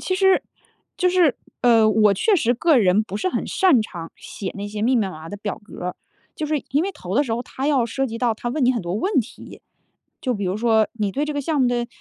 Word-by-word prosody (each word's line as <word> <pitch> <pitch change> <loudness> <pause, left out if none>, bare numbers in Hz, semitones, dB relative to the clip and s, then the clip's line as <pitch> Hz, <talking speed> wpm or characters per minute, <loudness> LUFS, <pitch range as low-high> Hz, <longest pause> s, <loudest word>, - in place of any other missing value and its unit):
其 370 - -1
实 385 0 +3 0.5
就 365 - +2
是， 355 -7 +3 0.3
呃， 230 -3 +5
我 215 -2 +4
确 420 - +2
实 245 -7 +2
个 300 +2 +3
人 200 0 +3
不 200 -2 -6
是 215 - -1
很 - - -2
擅 355 - +3
长 170 -6 -8
写 195 - -7
那 200 0 -5
些 210 0 -5
密 250 +3 +3
密 230 - +3
麻 - - -5
麻 160 -1 -10
的 205 - -6
表 205 0 -5
格。 180 -3 -6 0.4
就 310 - -3
是 300 -2 -1
因 285 +3 +1
为 390 +2 -2
投 185 - -6
的 285 +5 +3
时 235 - -3
候 235 +2 -1
他 265 +2 -5
要 275 -5 +2
涉 270 +3 -1
及 230 -1 -6
到 235 -2 +1
他 240 +2 -4
问 285 +3 -2
你 250 - +5
很 240 -5 -1
多 175 0 -4
问 380 - -1
题， 230 - -11 0.6
就 255 -2 -1
比 205 -2 -3
如 185 0 -1
说 220 -1 +3
你 210 -3 -2
对 280 +9 -1
这 300 - -3
个 290 - -2
项 300 +2 -1
目 255 - +4
的 240 -1 0
240 Hz, 280 characters per minute, -22 LUFS, 210-290 Hz, 0.6 s, 呃